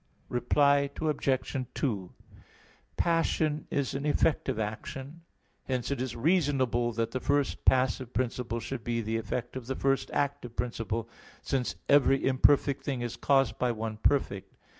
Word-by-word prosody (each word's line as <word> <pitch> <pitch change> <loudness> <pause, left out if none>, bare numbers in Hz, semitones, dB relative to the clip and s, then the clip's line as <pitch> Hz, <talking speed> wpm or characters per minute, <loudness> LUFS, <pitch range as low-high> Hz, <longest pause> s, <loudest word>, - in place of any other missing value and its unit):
Reply 140 +3 +3
Obj. 140 -4 0 0.2
2: 100 - -2 0.8
Passion 160 -2 +1
is 140 -2 -1
an 140 +2 -2
effect 150 +1 +2
of - - -1
action. 130 +8 -5 0.4
Hence 130 0 -2
it 140 -3 -1
is 130 -2 -3
reasonable 130 -5 +2
that 115 0 -1
the 130 - -2
first 140 +1 0
passive 130 -1 +2
principle 120 -2 -2
should 120 0 -5
be 115 0 -1
the 110 +1 -1
effect 115 +3 -4
of 125 -3 -6
the 135 - -2
first 135 0 +1
active 140 -4 -2
principle, 115 -2 -2 0.4
since 130 -3 -1
every 135 -1 +4
imperfect 135 +1 +3
thing 135 -4 -2
is 120 -1 -3
caused 135 -1 +2
by 125 -1 +2
one 110 -1 -4
perfect. 105 -5 0
130 Hz, 145 wpm, -29 LUFS, 115-140 Hz, 0.8 s, every